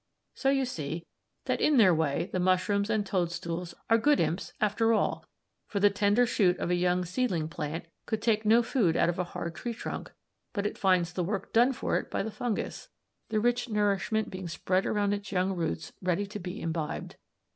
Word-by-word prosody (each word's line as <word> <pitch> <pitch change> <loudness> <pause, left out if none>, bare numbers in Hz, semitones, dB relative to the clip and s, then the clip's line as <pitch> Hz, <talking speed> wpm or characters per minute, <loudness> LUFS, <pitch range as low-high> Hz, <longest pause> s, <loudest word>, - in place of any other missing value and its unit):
So 270 - 0
we 270 -1 +2
see 165 - -4 0.4
that - - 0
in 300 -2 +4
their 195 -6 +7
way 160 +1 0
the 185 - 0
mushrooms 185 +3 +2
and 215 -2 +1
toadstools 175 -2 -2
are 230 0 +4
good 295 +5 +4
imps 175 +4 -1
after 225 +2 +2
all, 215 - 0 0.4
for 200 - -2
the 205 +1 +5
tender 205 +4 +3
shoot 190 -6 +2
of 175 - -2
a - - +3
young 180 0 +1
seedling 180 -4 -1
plant 160 +1 -4 0.2
could 220 - -1
take 220 -1 +1
no 225 +3 +5
food 220 - +1
out 170 - +3
of 175 - -2
a - - +2
hard 170 -1 -5
tree 235 +6 -5
trunk, - - -6 0.4
but 205 -3 -2
it 210 - -1
finds 180 -3 +2
the 180 - -1
work 195 +2 -3
done 240 +3 +5
for 255 - 0
it - - -9
by - - -1
the 220 - -4
fungus, 230 -1 -3 0.4
the 215 -1 +1
rich 245 +2 +1
nourishment 210 0 0
being 185 -1 -5
spread 185 +2 0
around 205 -1 +1
its 200 -1 -5
young 190 0 +1
roots 165 - -3
ready 185 +2 0
to 205 +1 -7
be 180 +3 -6
imbibed. 160 -2 -4
195 Hz, 200 wpm, -29 LUFS, 175-220 Hz, 0.4 s, their